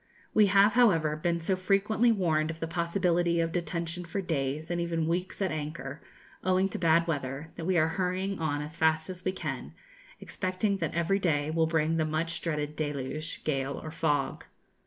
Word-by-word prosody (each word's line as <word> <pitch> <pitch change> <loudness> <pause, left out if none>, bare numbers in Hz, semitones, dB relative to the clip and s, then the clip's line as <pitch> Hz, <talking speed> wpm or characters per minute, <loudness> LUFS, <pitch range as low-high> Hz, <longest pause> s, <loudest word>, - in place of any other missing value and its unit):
We 215 -1 +6
have, 200 +2 +5
however, 165 -11 +4
been 170 +2 0
so 175 +3 0
frequently 200 +5 +2
warned 160 -7 +1
of 165 0 -5
the 165 - -2
possibility 170 0 +1
of 165 0 +1
detention 170 +1 -2
for 175 +4 -4
days 155 -2 -2
and 175 0 0
even 165 -2 -1
weeks 180 +4 -1
at 190 - 0
anchor, 150 -2 -5 0.4
owing 185 +1 +3
to - - -5
bad 165 -1 +4
weather, 145 -1 -3
that 165 - -6
we 185 0 +2
are 155 -1 +4
hurrying 185 +2 -1
on 145 -2 -1
as 155 +2 -7
fast 160 +1 +2
as 180 0 -8
we 185 - +1
can, 190 - -5 0.4
expecting 185 +2 -1
that - - -3
every 170 +4 +2
day 155 -5 +1
will 160 0 +2
bring 160 0 +1
the 160 - +2
much 160 +2 -1
dreaded 150 -2 -2
deluge, 150 +1 -3
gale, 135 -2 -1
or 155 - -7
fog. 145 -3 -1
165 Hz, 185 wpm, -29 LUFS, 155-185 Hz, 0.4 s, We